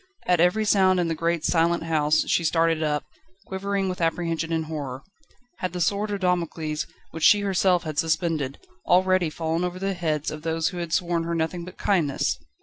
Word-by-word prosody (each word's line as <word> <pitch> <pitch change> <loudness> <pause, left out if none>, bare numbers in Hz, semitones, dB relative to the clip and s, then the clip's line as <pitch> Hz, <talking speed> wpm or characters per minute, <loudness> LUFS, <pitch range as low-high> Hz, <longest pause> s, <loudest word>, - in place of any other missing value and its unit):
At 180 -2 +3
every 180 +6 +3
sound 190 -3 +4
in 170 -2 0
the - - 0
great, 170 0 -1
silent 170 0 +2
house 155 -2 +2
she 170 - +2
started 165 0 +2
up, 150 -1 0 0.4
quivering 195 0 -2
with 180 -1 -4
apprehension 165 0 -1
and 160 -1 0
horror. 140 -4 -5 0.5
Had 185 -1 -3
the 180 - -4
sword 200 +5 0
of 200 -1 -3
Damocles, 165 -4 -1 0.2
which 160 - -7
she 205 - +6
herself 190 -2 +2
had 155 -2 -3
suspended, 160 -4 0 0.3
already 185 -1 +3
fallen 165 +2 -2
over 180 0 -3
the 195 +1 -1
heads 155 -4 -2
of 155 - -7
those 160 0 0
who 180 - -8
had 170 -2 -4
shown 170 -1 0
her 170 0 -2
nothing 165 +1 -2
but 180 - -11
kindness? 165 -9 0
170 Hz, 190 wpm, -25 LUFS, 160-180 Hz, 0.5 s, she